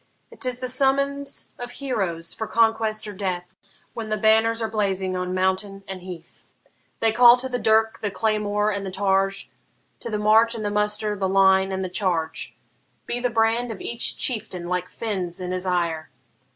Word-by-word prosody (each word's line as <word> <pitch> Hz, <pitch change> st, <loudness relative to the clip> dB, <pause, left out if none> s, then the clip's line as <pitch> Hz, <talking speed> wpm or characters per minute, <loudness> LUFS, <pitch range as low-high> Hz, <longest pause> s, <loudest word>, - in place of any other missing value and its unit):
'T 255 Hz, -, 0 dB
is 250 Hz, 0 st, -3 dB
the 255 Hz, -, -3 dB
summons 275 Hz, +2 st, 0 dB
of 245 Hz, 0 st, -7 dB
heroes 190 Hz, -12 st, -2 dB
for 220 Hz, -, -5 dB
conquest 225 Hz, -1 st, +1 dB
or 210 Hz, -, -6 dB
death, 185 Hz, -2 st, -4 dB, 0.4 s
When 225 Hz, -2 st, -6 dB
the 215 Hz, -, 0 dB
banners 220 Hz, +2 st, +3 dB
are 225 Hz, -, -1 dB
blazing 195 Hz, -4 st, -1 dB
on 180 Hz, 0 st, -3 dB
mountain 190 Hz, +1 st, -1 dB
and 190 Hz, -1 st, -7 dB
heath: 175 Hz, -2 st, -11 dB, 0.6 s
They 225 Hz, -1 st, +3 dB
call 240 Hz, +2 st, +7 dB
to 255 Hz, +1 st, -2 dB
the 250 Hz, -1 st, -3 dB
dirk, 220 Hz, 0 st, +2 dB
the 205 Hz, -, -1 dB
claymore, 210 Hz, 0 st, 0 dB
and 200 Hz, -1 st, -3 dB
the 195 Hz, -, -4 dB
targe, 195 Hz, 0 st, 0 dB, 0.5 s
To 235 Hz, -, -5 dB
the 215 Hz, -, -2 dB
march 220 Hz, +3 st, +4 dB
and 215 Hz, -2 st, -5 dB
the 205 Hz, -, -1 dB
muster, 210 Hz, 0 st, 0 dB
the 190 Hz, -1 st, -1 dB
line 190 Hz, 0 st, +4 dB
and 190 Hz, 0 st, -2 dB
the -, -, -2 dB
charge. 175 Hz, -3 st, -2 dB, 0.5 s
Be 240 Hz, -, -3 dB
the 245 Hz, 0 st, 0 dB
brand 230 Hz, +1 st, +1 dB
of 210 Hz, -, -7 dB
each 235 Hz, 0 st, +3 dB
chieftain 185 Hz, -8 st, 0 dB
like 180 Hz, 0 st, -2 dB
Fin's 190 Hz, -6 st, -4 dB
in 180 Hz, 0 st, -4 dB
his 185 Hz, 0 st, -3 dB
ire! 170 Hz, -4 st, -1 dB
210 Hz, 185 wpm, -23 LUFS, 185-225 Hz, 0.6 s, call